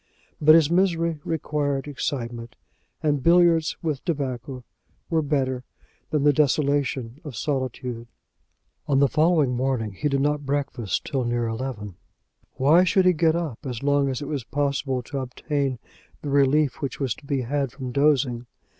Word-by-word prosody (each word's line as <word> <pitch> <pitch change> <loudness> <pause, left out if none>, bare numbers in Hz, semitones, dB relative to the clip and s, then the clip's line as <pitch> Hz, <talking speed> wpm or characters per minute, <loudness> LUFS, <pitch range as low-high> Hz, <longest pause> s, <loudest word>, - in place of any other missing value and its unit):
But 155 +1 +8
his 160 -1 +4
misery 170 -3 +1
required 145 -3 -2
excitement, 120 -4 -4 0.5
and 145 -3 +1
billiards 170 0 +4
with 150 -5 -2
tobacco 130 -5 -3 0.5
were 160 -1 +3
better 130 -4 -1 0.5
than 150 -2 0
the 145 0 +5
desolation 140 -3 0
of 145 -6 -8
solitude. 125 -3 -3 0.8
On 140 -3 +2
the 140 +1 +5
following 155 -4 +2
morning 125 -4 -1
he 145 +10 -2
did 140 -1 +1
not 145 +1 0
breakfast 135 -7 -2
till 135 -2 -1
near 120 0 -1
eleven. 115 -5 -5 0.6
Why 155 +7 +5
should 185 +1 +3
he 180 - +6
get 160 0 +2
up 160 -9 -3
as 125 -3 -5
long 140 -1 +2
as 130 +2 -3
it - - -6
was 140 -4 -3
possible 140 -1 -1
to 135 +3 -5
obtain 135 +1 -2 0.5
the 145 - -3
relief 140 0 +2
which 140 - -4
was 135 -5 0
to 150 - -17
be 140 -2 0
had 135 +1 -1
from 130 -3 -6
dozing? 130 -3 +1
140 Hz, 155 wpm, -24 LUFS, 125-150 Hz, 0.8 s, But